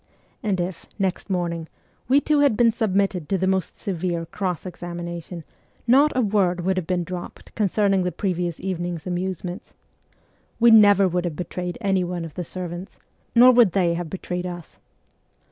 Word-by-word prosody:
And 200 -3 -1
if, 175 -1 -4
next 195 0 -2
morning, 170 -3 -2 0.4
we 270 +3 +5
two 300 0 +1
had 280 -7 +3
been 235 -1 +5
submitted 195 -6 0
to 195 - +1
the 190 - 0
most 190 -1 -1
severe 175 -3 -3
cross 180 0 -3
examination, 175 -1 -6 0.4
not 275 +5 +5
a - - +4
word 195 -4 +1
would 190 +2 0
have 180 -3 -2
been 180 -1 0
dropped 180 0 -8
concerning 200 -2 +2
the 180 0 -1
previous 175 -4 -2
evening's 175 -3 -4
amusements. 180 0 -4 0.8
We 235 0 +6
never 205 -3 +7
would 180 0 -1
have 170 -3 -3
betrayed 180 +1 -4
any 195 -3 +1
one 175 -1 -4
of 160 - -9
the 180 - -4
servants, 180 +1 -7 0.4
nor 245 +2 +9
would 235 -7 +5
they 175 -4 +2
have 170 -1 -4
betrayed 180 0 -4
us. 175 -2 -9
185 Hz, 165 wpm, -23 LUFS, 175-200 Hz, 0.8 s, nor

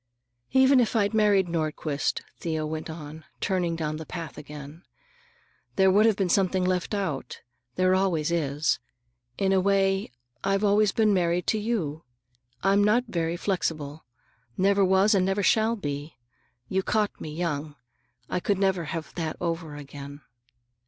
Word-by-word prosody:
"Even 265 0 +5
if 235 -1 +1
I'd 205 -1 +2
married 205 -4 +4
Nordquist," 155 -3 -2 0.2
Thea 160 -2 -2
went 155 +1 -4
on, 155 -1 -8 0.2
turning 180 -3 0
down 155 -2 -3
the 160 - -7
path 165 -4 -6
again, 150 +1 -10 0.9
"there 190 -1 +5
would 210 +4 +5
have 220 - +3
been 195 -2 0
something 185 0 +2
left 185 +2 0
out. 185 -9 -3 0.3
There 185 0 +3
always 175 -4 +1
is. 150 -3 0 0.6
In 195 -1 +1
a 190 - +4
way, 195 0 +2 0.3
I've 195 +1 +1
always 205 0 +4
been 215 -1 +3
married 175 -1 +1
to 215 - 0
you. 175 -9 -2 0.6
I'm 195 +2 +4
not 215 +4 +3
very 170 -3 -1
flexible; 160 -6 -2 0.5
never 200 +1 +3
was 190 +3 +4
and 190 -2 +3
never 195 +2 0
shall 220 +3 +3
be. 145 -5 -5 0.5
You 190 0 0
caught 210 +1 -1
me - - -5
young. 155 -3 -3 0.5
I - - -1
could 200 +2 0
never 190 -3 +1
have 160 +1 -5
that 160 -2 -3
over 165 -3 -3
again. 145 0 -9
180 Hz, 150 wpm, -26 LUFS, 155-200 Hz, 0.9 s, Even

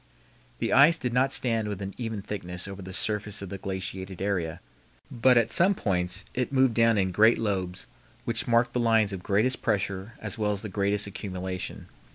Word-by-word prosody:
The - - -1
ice 150 +5 +7
did 125 -6 -3
not 130 +2 +2
stand 115 -5 0
with 100 -2 -4
an 100 0 -5
even 115 -4 -4
thickness 90 -3 -4
over 100 0 -8
the 95 0 -8
surface 105 +1 -1
of 95 - -7
the 95 - -6
glaciated 95 -1 -5
area, 90 -4 -2 0.5
but 125 0 +4
at 115 - +2
some 190 +3 +4
points 95 - -2
it 125 +1 -2
moved 130 -3 +3
down 115 -1 +4
in 95 -2 +1
great 110 +5 +5
lobes, 95 -5 -2 0.4
which 115 -1 -1
marked 120 0 +3
the 125 - 0
lines 110 -3 +3
of 95 - -5
greatest 110 +8 +1
pressure 100 0 -1
as 105 +1 -6
well 105 -1 +1
as 100 +1 -6
the 105 - -5
greatest 100 +1 +1
accumulation. 95 -2 -5
105 Hz, 195 wpm, -27 LUFS, 95-115 Hz, 0.5 s, ice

